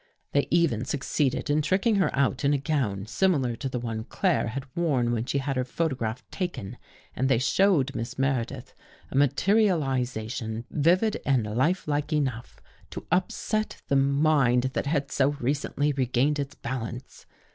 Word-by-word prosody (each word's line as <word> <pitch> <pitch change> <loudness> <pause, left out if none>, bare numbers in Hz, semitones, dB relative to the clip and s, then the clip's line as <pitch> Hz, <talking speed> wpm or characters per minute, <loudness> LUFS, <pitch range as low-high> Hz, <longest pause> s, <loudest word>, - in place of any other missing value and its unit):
They 140 - +1
even 160 -10 +2
succeeded 135 +1 -1
in 150 +1 +3
tricking 195 +7 +2
her 190 -6 +3
out 135 -1 +1
in 140 +1 +3
a - - +2
gown 130 -10 -1
similar 135 - +1
to 135 - -3
the 125 - -3
one 115 -2 -4
Claire 180 -2 0
had 130 +4 -4
worn 140 -9 +1
when 115 -1 -1
she 140 - -1
had 135 0 -1
her 130 - +1
photograph 125 -4 -3
taken 175 - -4 0.4
and 130 +1 0
they 135 - +4
showed 145 - +2
Miss 120 +1 -5
Meredith 130 -2 -2 0.4
a - - -6
materializa 140 - +2
tion 115 -1 -4
vivid 180 +8 +2
and 130 -6 +2
lifelike 150 +1 0
enough 130 -6 -2 0.3
to - - -8
upset 215 +4 -1
the 140 - +3
mind 135 -2 +3
that - - -2
had 140 -2 -1
so 140 +1 +2
recently 145 +2 0
regained 135 +2 +1
its 140 0 -4
balance. 125 0 -6
135 Hz, 155 wpm, -26 LUFS, 125-155 Hz, 0.4 s, they